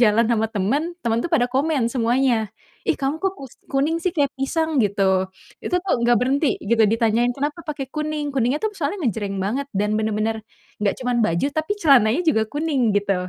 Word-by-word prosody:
jalan 230 Hz, 0 st, +4 dB
sama 225 Hz, -2 st, +2 dB
temen, 260 Hz, -, -1 dB
temen 230 Hz, -1 st, +1 dB
tuh -, -, -1 dB
pada 245 Hz, -6 st, +3 dB
komen 270 Hz, -2 st, +1 dB
semuanya, 240 Hz, -2 st, +1 dB, 0.4 s
ih -, -, +2 dB
kamu 275 Hz, +2 st, -1 dB
kok 385 Hz, -1 st, 0 dB
kus 270 Hz, -7 st, -10 dB, 0.2 s
kuning 290 Hz, +5 st, +1 dB
sih 360 Hz, +1 st, -1 dB
kayak 285 Hz, -4 st, +1 dB
pisang 315 Hz, +1 st, 0 dB
gitu. 190 Hz, -2 st, +1 dB, 0.3 s
Itu 360 Hz, -, -1 dB
tuh 380 Hz, -, -2 dB
gak 240 Hz, 0 st, +5 dB
berhenti 275 Hz, +4 st, +1 dB
gitu 225 Hz, +2 st, +2 dB
ditanyain, 230 Hz, +2 st, +2 dB
"Kenapa 295 Hz, +4 st, -3 dB
pake 280 Hz, -3 st, -4 dB
kuning?" 305 Hz, -1 st, -2 dB
kuningnya 260 Hz, +2 st, +1 dB
tuh 435 Hz, -, -1 dB
soalnya 330 Hz, +2 st, -3 dB
ngejreng 205 Hz, -3 st, -2 dB
banget 255 Hz, +8 st, -2 dB
dan 210 Hz, +2 st, +1 dB
bener-bener 220 Hz, +1 st, -1 dB, 0.4 s
gak 200 Hz, -, +2 dB
cuman 250 Hz, -1 st, 0 dB
baju, 170 Hz, +6 st, +1 dB
tapi 315 Hz, +5 st, -1 dB
celananya 265 Hz, -3 st, +5 dB
juga 255 Hz, -9 st, +3 dB
kuning 285 Hz, -5 st, 0 dB
gitu. 195 Hz, -3 st, 0 dB
250 Hz, 185 wpm, -22 LUFS, 220-295 Hz, 0.4 s, gak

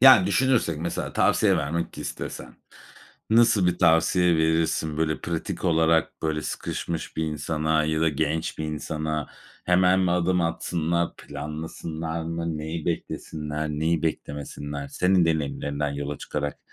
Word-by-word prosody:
Yani, 130 Hz, -8 st, +9 dB
düşünürsek 115 Hz, -, +2 dB
mesela 85 Hz, +2 st, -3 dB
tavsiye 100 Hz, -3 st, +3 dB
vermek 80 Hz, +2 st, -2 dB
istesen -, -, -6 dB, 0.8 s
nasıl 115 Hz, -4 st, +5 dB
bir 90 Hz, 0 st, +1 dB
tavsiye 85 Hz, +1 st, +4 dB
verirsin? 80 Hz, -1 st, +1 dB
Böyle, 80 Hz, -1 st, 0 dB
pratik 85 Hz, -1 st, -4 dB
olarak, 80 Hz, -1 st, +2 dB
böyle, 80 Hz, -1 st, -1 dB
sıkışmış 85 Hz, +3 st, -4 dB
bir 80 Hz, -, 0 dB
insana 80 Hz, 0 st, 0 dB
ya 80 Hz, 0 st, 0 dB
da 80 Hz, -, +4 dB
genç 80 Hz, +2 st, -1 dB
bir 80 Hz, -, -2 dB
insana. 75 Hz, 0 st, -3 dB, 0.4 s
Hemen 90 Hz, +1 st, +4 dB
mi 90 Hz, -2 st, +2 dB
adım 90 Hz, +1 st, +2 dB
atsınlar, 85 Hz, 0 st, -1 dB
planlasınlar 80 Hz, +2 st, -5 dB
mı? 85 Hz, -1 st, -3 dB
Neyi 80 Hz, +1 st, -4 dB
beklesinler, 75 Hz, -2 st, -3 dB
neyi 80 Hz, +2 st, 0 dB
beklemesinler? 70 Hz, -2 st, -4 dB
Senin 90 Hz, +3 st, +3 dB
deneyimlerinden 75 Hz, -2 st, -1 dB
yola 70 Hz, 0 st, -4 dB
çıkarak, 75 Hz, -1 st, -3 dB
80 Hz, 130 wpm, -25 LUFS, 75-85 Hz, 0.8 s, Yani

